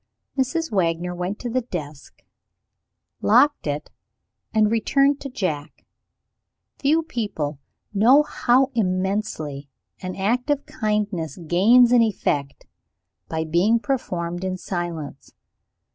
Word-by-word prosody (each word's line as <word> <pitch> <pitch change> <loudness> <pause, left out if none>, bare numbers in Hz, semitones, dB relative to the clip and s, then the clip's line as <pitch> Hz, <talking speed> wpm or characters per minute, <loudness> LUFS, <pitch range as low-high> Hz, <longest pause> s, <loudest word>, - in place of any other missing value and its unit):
Mrs. 300 +4 -1
Wagner 175 -2 0
went 180 +3 -3
to 245 - -3
the 255 +2 +1
desk, 155 - -8 1.0
locked 290 - +4
it, 145 +1 -3 0.6
and 215 -1 +3
returned 275 +5 +2
to 275 - -5
Jack. 160 - -4 0.9
Few 310 +4 +2
people 200 - -3 0.3
know 245 +9 +6
how 265 -2 +2
immensely 185 -8 -2 0.3
an 185 0 -5
act 240 +8 0
of 290 -1 0
kindness 210 - -2
gains 205 +9 +5
in 245 -1 +6
effect, 145 -10 -1 0.6
by 160 0 -1
being 175 +8 +3
performed 175 - -3
in 185 0 -2
silence. 170 -6 -5
200 Hz, 110 wpm, -23 LUFS, 170-245 Hz, 1.0 s, know